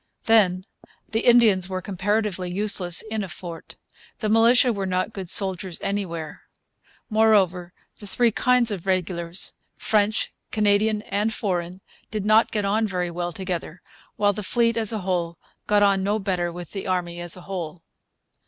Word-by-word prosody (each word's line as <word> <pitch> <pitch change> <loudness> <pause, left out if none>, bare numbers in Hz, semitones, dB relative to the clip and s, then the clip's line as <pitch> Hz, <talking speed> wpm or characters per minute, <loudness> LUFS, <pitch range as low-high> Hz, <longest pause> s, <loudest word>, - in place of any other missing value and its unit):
Then, 190 -5 +3 0.5
the 225 - +1
Indians 225 -6 +4
were 185 -1 -2
comparatively 195 -1 -2
useless 185 -3 +1
in 220 -1 -3
a - - -5
fort. 170 0 -9 0.4
The 215 - -2
militia 235 +3 +5
were 195 -2 -3
not 185 +4 -1
good 190 -3 -6
soldiers 190 -2 0
anywhere. 170 -6 -4 0.7
Moreover, 200 -5 +2 0.3
the 205 - -10
three 235 +3 +2
kinds 250 +1 +2
of 195 -2 -5
regulars 180 -1 -1 0.2
French, 210 0 +1 0.2
Canadian, 210 0 +2
and 205 +2 -1
foreign 180 -3 -3 0.3
did 210 -2 -4
not 215 +2 +4
get 210 -2 -1
on 215 +3 +1
very 180 -3 -2
well 175 0 -3
together; 180 -2 -5 0.3
while 205 -1 +2
the 210 - -5
fleet, 230 +4 +1
as 225 -2 +1
a 220 -2 -3
whole, 170 -3 -1 0.3
got 205 -1 +4
on 195 -1 +3
no 205 +2 +1
better 185 -4 -1
with 175 -1 -9
the 195 -1 -5
army 175 -2 -2
as 175 +1 -1
a - - -10
whole. 175 -3 -6
195 Hz, 160 wpm, -24 LUFS, 180-215 Hz, 0.7 s, militia